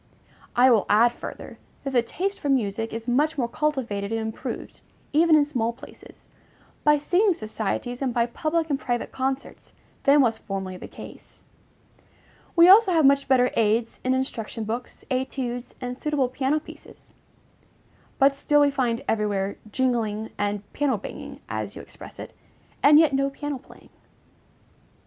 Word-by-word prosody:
I 250 +1 +6
will 220 -4 +3
add 230 +3 +5
further, - - -9 0.2
that 275 - -3
the 245 - +4
taste 385 +11 -3
for 290 - -3
music 225 -4 0
is 225 +1 -6
much 295 +6 +1
more 245 -4 0
cultivated 235 -8 -2
and 225 - 0
improved, 220 0 -6 0.3
even 320 +1 +5
in 295 -1 +5
small 235 -6 -1
places, 265 +5 -14 0.6
by 295 0 +5
singing 360 +6 +2
societies 220 +3 -4
and 265 -2 0
by 235 0 +2
public 315 +6 -2
and 275 - 0
private 240 -1 -2
concerts, 265 +1 -4 0.3
than 280 +1 +6
was 230 -4 +1
formerly 190 -2 -5
the - - -9
case. - - -13 1.1
We 340 0 +8
also 395 +1 +8
have 320 -3 +4
much 280 0 +4
better 255 -2 +4
aids 225 +1 +1
in 255 0 +2
instruction 230 -4 -3
books, 230 +3 -6
études, 255 -1 -3
and 250 -1 -4
suitable 280 -2 0
piano 270 +4 0
pieces; 305 - -14 1.0
but 275 0 +4
still 295 +1 +3
we 285 -1 +4
find 245 -4 -1
everywhere 205 -2 -1
"jingling" 225 -4 -1
and 205 0 -2
"piano 280 -5 +1
banging," 205 - -9
as - - -4
you - - -7
express - - -11
it, - - -9 0.5
and 295 +1 +7
yet 315 -2 +5
no 275 +1 +1
piano 285 0 -5
playing. - - -18
255 Hz, 155 wpm, -25 LUFS, 225-290 Hz, 1.1 s, We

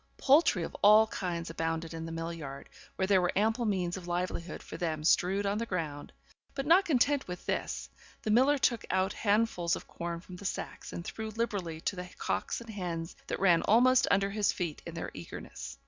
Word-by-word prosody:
Poultry 275 - +4
of - - -6
all 215 +2 +8
kinds 175 -6 -4
abounded 165 0 -2
in 165 0 -5
the - - -6
mill 165 +1 -4
yard, 140 -4 -8 0.3
where 190 - 0
there 190 -1 +4
were 175 - +1
ample 220 +4 +2
means 185 -4 0
of 180 -2 -9
livelihood 175 -1 -3
for - - -9
them 155 -3 -2
strewed 190 +5 +3
on 200 +2 0
the 230 - -1
ground; 155 -7 -4 0.4
but 275 -1 -2
not 350 +6 +6
content 280 -2 +2
with 180 0 -7
this, - - -2 0.4
the 215 - 0
miller 265 +6 +5
took 235 -4 +1
out 190 +1 +1
handfuls 205 -5 +1
of - - -9
corn 170 0 -5
from 180 +1 -11
the 200 - -11
sacks, - - -4
and 170 - -6
threw 220 +1 -5
liberally 200 -7 -3
to 200 - -1
the 180 0 -6
cocks - - -2
and 230 -1 -9
hens 170 -4 -4
that - - -3
ran 175 -4 +5
almost 250 +4 +5
under 195 0 +2
his 205 0 +2
feet 170 -4 -4
in 170 - -7
their 165 - -4
eagerness. 85 -5 -8
185 Hz, 205 wpm, -31 LUFS, 170-220 Hz, 0.4 s, all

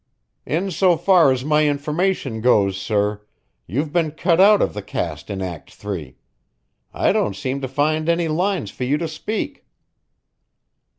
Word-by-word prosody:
"In 180 +6 -1
so 175 0 +3
far 180 -7 +5
as 130 0 -2
my 150 0 +3
information 145 -4 -1
goes, 100 -5 +3
sir, 105 +1 -1 0.5
you've 145 - -2
been 165 -3 +2
cut 170 +3 +2
out 205 +1 +7
of - - 0
the 105 - -5
cast 80 -4 -5
in 95 -2 -3
Act 85 -4 -7
Three. 90 -10 -6 0.7
I - - +1
don't 100 - 0
seem 130 +8 -3
to 130 - -2
find 155 +4 0
any 170 0 +2
lines 175 - -1
for - - -6
you 135 +4 +1
to 165 - -3
speak." 215 - -4
145 Hz, 160 wpm, -21 LUFS, 105-170 Hz, 0.7 s, out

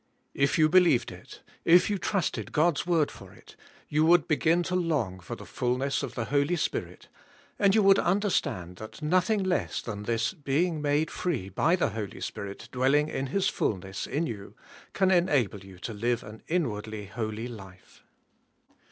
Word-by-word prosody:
If 140 +5 +1
you 155 -1 +5
be 185 +4 +6
lieved 165 -9 +2
it, - - -13 0.2
if 175 +2 +6
you 205 -2 -1
trusted 195 -2 -2
God's 165 +1 +2
word 165 -4 +2
for - - -13
it, - - -17 0.3
you 155 +1 +2
would 170 -1 +5
begin 165 +3 +2
to 180 +1 -2
long 145 - 0
for 90 - -7
the - - -11
fullness 125 +3 -1
of - - -5
the 115 - -2
Holy 140 +6 +1
Spirit 165 - -3 0.5
and 200 -1 +4
you 215 - +4
would 195 0 +6
understand 175 - 0
that 110 +8 -10
nothing 185 +6 +2
less 185 -1 -1
than 105 -3 -6
this 115 - -1
being 155 +1 0
made 145 +2 +1
free 135 - -2
by 155 - +2
the 175 - +1
Holy 105 -2 -6
Spirit 100 -1 -6
dwelling 135 +4 +2
in 135 -2 -3
His 195 +7 0
fullness 95 - -2
in 160 +4 -1
you 105 -9 -7 0.4
can 190 -1 +2
enable 145 - +2
you 95 -1 -13
to 110 +5 -6
live 120 +3 -1
an 110 +1 -11
inwardly 110 - -2
holy 110 +2 -4
life. 95 -6 -12
145 Hz, 175 wpm, -28 LUFS, 110-175 Hz, 0.5 s, be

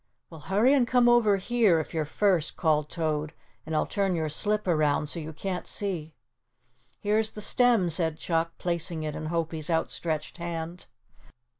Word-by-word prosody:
"Well, 160 - -10
hurry 210 - +3
and 260 -4 +3
come 245 0 +4
over 230 -4 +4
here, 205 -4 +2
if 155 - -6
you're 160 -2 -1
first," 180 0 0
called 155 -3 +1
Toad, 155 -2 -2 0.3
"and 160 - -2
I'll 155 - +2
turn 195 -3 0
your 160 -2 -1
slip 210 +6 0
around 150 -3 +1
so 170 - -3
you 160 0 -6
can't 180 +3 -4
see." 170 -6 -2 0.8
"Here's 215 +1 +2
the - - -8
stem," 240 -7 +3
said 160 -1 +1
Chuck, 165 0 -1
placing 170 -2 -2
it 150 -1 -4
in 155 - -5
Hopie's 160 -1 -2
outstretched 160 -1 -2
hand. 170 0 -5
170 Hz, 165 wpm, -27 LUFS, 155-200 Hz, 0.8 s, come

